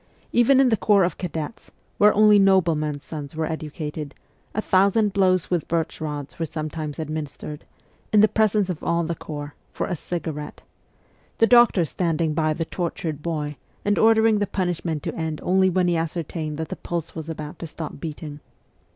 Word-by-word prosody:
Even 250 +3 +5
in 270 -2 +5
the 220 - +2
corps 200 -2 +4
of 175 - -1
cadets, 165 +3 -5 0.3
where 210 +1 +7
only 210 0 +6
noblemen's 160 -7 +2
sons 145 -2 -7
were 160 0 -1
educated, 155 -2 -5 0.4
a - - 0
thousand 200 +1 +3
blows 185 -3 +2
with 175 -4 0
birch 165 -1 -2
rods 145 -2 -5
were 165 - 0
sometimes 155 -1 -5
administered, 155 -1 -5 0.5
in 215 - +5
the 215 - +7
presence 215 -2 +2
of 180 -4 -5
all 170 0 +1
the 170 +1 -2
corps, 145 -2 -7 0.2
for - - -2
a 180 - -2
cigarette 160 -3 -5 0.7
the 225 - +5
doctor 240 -7 +5
standing 165 -1 0
by 155 0 +1
the 165 +2 -2
tortured 160 -3 -3
boy, 150 -3 -3 0.3
and 205 0 +2
ordering 220 -1 +5
the 205 - 0
punishment 175 -5 -2
to - - -3
end 160 -2 -3
only 190 +1 +3
when 180 0 +2
he 175 - +2
ascertained 160 -2 -3
that 160 -1 -4
the - - -4
pulse 170 -2 -4
was 160 -1 -6
about 155 -2 -6
to 165 - -5
stop 155 -1 -7
beating. 150 -1 -6
165 Hz, 175 wpm, -24 LUFS, 155-190 Hz, 0.7 s, where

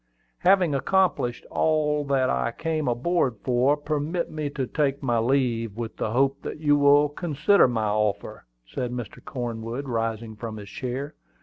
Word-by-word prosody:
"Having 185 -4 +4
accomplished 140 -5 +1
all 150 -1 +1
that 135 -2 +2
I 65 0 0
came 155 -4 -1
on 120 +1 -2
board 170 -9 +1
for, 130 +3 +2
permit 150 +3 -2
me 155 -2 -3
to 140 -2 -3
take 140 0 -1
my 120 -3 +1
leave, 115 -3 0
with 115 -1 -5
the - - -1
hope 135 +4 +1
that - - -6
you 145 -2 +3
will 145 +1 +5
consider 155 +3 +3
my 115 -3 -1
offer," 105 - -1 0.2
said 120 - -4
Mr. 120 -3 -7
Cornwood, 120 +1 -5
rising 115 -2 -2
from 110 0 -6
his 100 -2 -9
chair. 135 +4 -4
135 Hz, 165 wpm, -25 LUFS, 115-150 Hz, 0.2 s, will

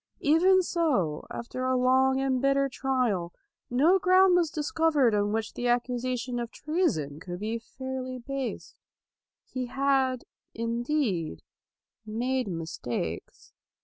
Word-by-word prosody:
Even 365 +5 +5
so, 260 - 0
after 250 +2 -5
a 255 0 +2
long 260 +1 +3
and 265 -2 0
bitter 275 0 +3
trial, 250 -10 -1 0.4
no 310 +10 +4
ground 370 -1 +5
was 345 -3 +3
discovered 300 -5 +2
on 205 0 +1
which 220 0 -2
the 245 - -2
accusation 245 0 -1
of 235 -1 -3
treason 275 - -1
could 175 +1 -7
be 220 +3 -2
fairly 255 +1 -6
based. 270 +1 -5 0.7
He 255 -1 -4
had, 265 -1 +1 0.3
indeed, 230 - -1 0.6
made 245 +4 -1
mistakes. 160 - -5
255 Hz, 115 wpm, -28 LUFS, 225-275 Hz, 0.7 s, Even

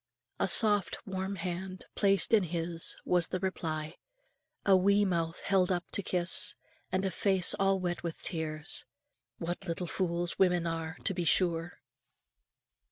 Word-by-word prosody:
A - - +1
soft 205 -4 +6
warm 190 0 -4
hand 185 +1 -6
placed 195 0 +2
in 220 - +6
his, 165 0 0
was 175 -2 +2
the 185 - -3
reply; 155 -4 -4 0.7
a 195 - +6
wee 200 +2 +3
mouth 165 -3 -2
held 190 -2 +1
up 180 -1 -1
to - - -2
kiss, 185 +2 +1 0.4
and 190 +1 0
a 190 - -1
face 190 -3 +2
all 195 0 +2
wet 175 -1 -3
with 170 -1 -6
tears. 155 -3 -1 0.5
What 175 +3 -5
little 170 +1 -3
fools 175 -1 -3
women 180 -2 +3
are, 165 -1 -4
to 195 - 0
be 175 -1 -2
sure! 170 0 +1
180 Hz, 150 wpm, -30 LUFS, 170-190 Hz, 0.7 s, soft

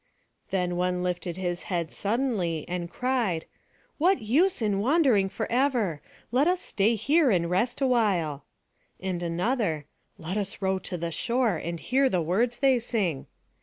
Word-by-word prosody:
Then 180 -2 -1
one 180 0 0
lifted 180 -1 -3
his 175 -2 -2
head 170 -4 -2
suddenly, 200 - -1
and 175 -1 -3
cried, 235 -7 -1 0.5
"What 365 +5 +4
use 300 - +2
in 205 -4 0
wandering 245 - +3
forever? 225 - 0 0.3
Let 265 +6 +3
us 360 0 +2
stay 220 - +1
here 280 - +3
and 175 -5 +1
rest 240 +9 0
awhile." 195 - +1 0.6
And 185 -2 -3
another, 175 - -1 0.3
"Let 175 +5 -4
us 200 0 -3
row 190 -1 0
to 180 - -3
the 170 0 -3
shore, 235 +2 +1
and 170 +1 -4
hear 265 +6 +2
the 185 - +1
words 215 +9 0
they 265 -3 +4
sing." 205 - -2
200 Hz, 150 wpm, -27 LUFS, 175-250 Hz, 0.6 s, What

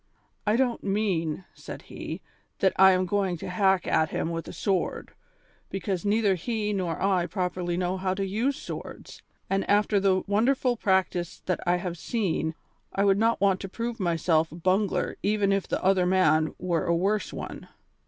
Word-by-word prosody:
"I 210 - +4
don't 245 -1 0
mean," 190 -5 -1
said - - -9
he, - - -7 0.4
"that 190 - +2
I 190 0 +7
am 185 0 +1
going 190 -1 0
to - - -7
hack 190 0 +2
at 160 0 +2
him 165 - -2
with 165 0 -4
a - - -6
sword, 195 -3 -2 0.6
because 190 -1 -3
neither 205 -1 +2
he 210 +3 -2
nor 180 -5 -2
I 185 -3 +1
properly 180 -1 -2
know 180 +1 -1
how 185 0 -1
to 195 0 -1
use 225 +8 0
swords, - - -8 0.3
and 195 0 0
after 205 0 +3
the 190 -1 +2
wonderful 245 +5 +2
practice 190 -5 0
that 180 - 0
I 175 - +4
have 175 -1 -4
seen, 170 -8 -1 0.4
I 200 - +1
would 195 0 +4
not 230 +1 +2
want 195 -2 +3
to 195 - -6
prove 230 +3 -4
myself 165 -2 +1
a - - -9
bungler 185 +4 0
even 205 -1 +1
if 195 -1 0
the - - -2
other 185 -1 +3
man 160 -4 +3
were 175 -3 -1
a 170 - +3
worse 200 +5 0
one. - - -7
190 Hz, 180 wpm, -27 LUFS, 175-205 Hz, 0.6 s, I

